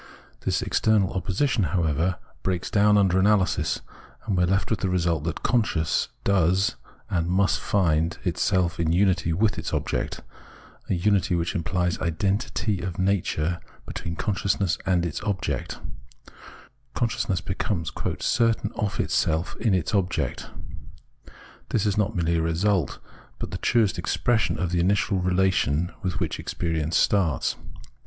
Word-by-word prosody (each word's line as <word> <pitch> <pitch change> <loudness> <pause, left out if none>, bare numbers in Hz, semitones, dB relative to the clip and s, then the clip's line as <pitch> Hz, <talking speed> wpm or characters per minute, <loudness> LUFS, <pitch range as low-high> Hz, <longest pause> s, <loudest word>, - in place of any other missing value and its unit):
This - - -1
external 105 -4 +2
opposition, 100 - 0
however, 85 0 0 0.2
breaks 90 -2 -2
down 105 -1 +5
under 95 -2 +3
analysis, 100 -1 +2 0.4
and 100 - 0
we 90 - +3
are - - -1
left 95 +4 0
with 110 - +1
the 95 - -1
result 85 -4 0
that 85 0 -3
consciousness 110 -10 +1 0.2
does 95 0 +2 0.4
and 85 -3 0
must 95 +2 +2
find 85 -4 +1
itself 90 -3 +1
in 80 -1 +1
unity 90 -1 +2
with 105 +5 +1
its - - -3
object, - - -2 0.7
a - - +2
unity 95 0 +2
which 85 0 -1
implies 90 0 -1
identity 100 +3 -1
of 90 -3 -4
nature 90 -3 0 0.3
between 85 -1 -5
consciousness 100 -1 0
and 90 -2 +2
its 85 - -4
object: 100 -3 -2 1.2
consciousness 110 -6 0
becomes 90 -2 -2 0.2
" - - -5
certain 115 -2 +1
of 105 -1 -2
itself 80 +2 0
in 110 -5 +2
its 90 +4 -1
object." 95 -3 -1 1.2
This 110 - +1
is 105 -2 +1
not 105 +1 0
merely 85 -1 +1
a - - +1
result, 85 +1 +1 0.4
but - - -5
the - - -4
truest 115 -4 +2
expression 120 -2 +1
of 90 -1 -1
the 90 - +1
initial 95 +2 +2
relation 90 -3 +1
with 90 -2 -2
which - - -2
experience 80 -1 -1
starts. 85 -10 +2
95 Hz, 140 wpm, -25 LUFS, 85-100 Hz, 1.2 s, down